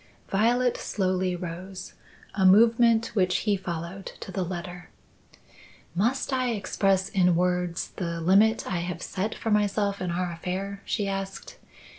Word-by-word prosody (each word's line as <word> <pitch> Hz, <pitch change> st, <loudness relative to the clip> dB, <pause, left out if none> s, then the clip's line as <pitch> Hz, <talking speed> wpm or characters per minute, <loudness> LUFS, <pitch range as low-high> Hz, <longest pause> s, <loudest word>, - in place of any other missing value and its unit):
Violet 240 Hz, +5 st, +2 dB
slowly 185 Hz, -2 st, -1 dB
rose 180 Hz, +2 st, -7 dB, 0.4 s
a 195 Hz, -, 0 dB
movement 230 Hz, +3 st, +5 dB
which 185 Hz, -3 st, +2 dB
he 210 Hz, -2 st, +3 dB
followed 180 Hz, 0 st, -5 dB
to -, -, -7 dB
the 190 Hz, -, -2 dB
letter. 180 Hz, 0 st, -6 dB, 1.0 s
"Must 240 Hz, +10 st, 0 dB
I 255 Hz, -2 st, +1 dB
express 195 Hz, -2 st, +1 dB
in 180 Hz, -3 st, +3 dB
words 180 Hz, -1 st, 0 dB
the 170 Hz, -2 st, -3 dB
limit 200 Hz, +6 st, +4 dB
I 185 Hz, -, -2 dB
have 175 Hz, 0 st, -4 dB
set 200 Hz, +3 st, -3 dB
for 225 Hz, -, -3 dB
myself 205 Hz, -1 st, +1 dB
in 180 Hz, -, -2 dB
our 175 Hz, +1 st, -1 dB
affair?" 190 Hz, +4 st, -4 dB
she 205 Hz, -3 st, -1 dB
asked. 195 Hz, 0 st, -5 dB
190 Hz, 140 wpm, -26 LUFS, 180-210 Hz, 1.0 s, movement